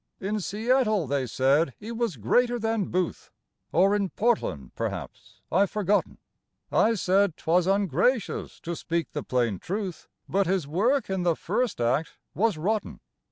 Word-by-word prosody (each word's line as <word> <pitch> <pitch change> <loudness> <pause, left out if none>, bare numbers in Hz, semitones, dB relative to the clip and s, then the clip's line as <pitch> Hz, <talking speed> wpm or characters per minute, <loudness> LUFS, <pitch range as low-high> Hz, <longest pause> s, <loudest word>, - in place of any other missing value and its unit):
In 205 +3 -2
Seattle 215 0 +1
they 135 -1 -1
said 135 +4 +2
he 220 +3 -8
was 230 -6 -1
greater 245 - +2
than 225 -3 0
Booth, 180 -1 -2 0.4
(Or 195 +4 +4
in 200 -2 0
Portland, 185 - -1
perhaps; - - -6
I've 195 +2 +3
forgotten); 205 -1 0 0.5
I 225 +1 +3
said 190 -1 +2
'twas 175 +2 +2
ungracious 195 - +1
to 170 +1 -4
speak 165 -2 -2
the - - -3
plain 120 -7 0
truth, 195 -2 -4 0.2
But 195 -1 +1
his 185 -5 0
work 230 - +1
in 190 -1 0
the 175 -2 +2
first 215 - -1
act 125 +7 0 0.2
was 215 -2 +1
rotten. 210 +7 -2
190 Hz, 150 wpm, -26 LUFS, 165-215 Hz, 0.5 s, Or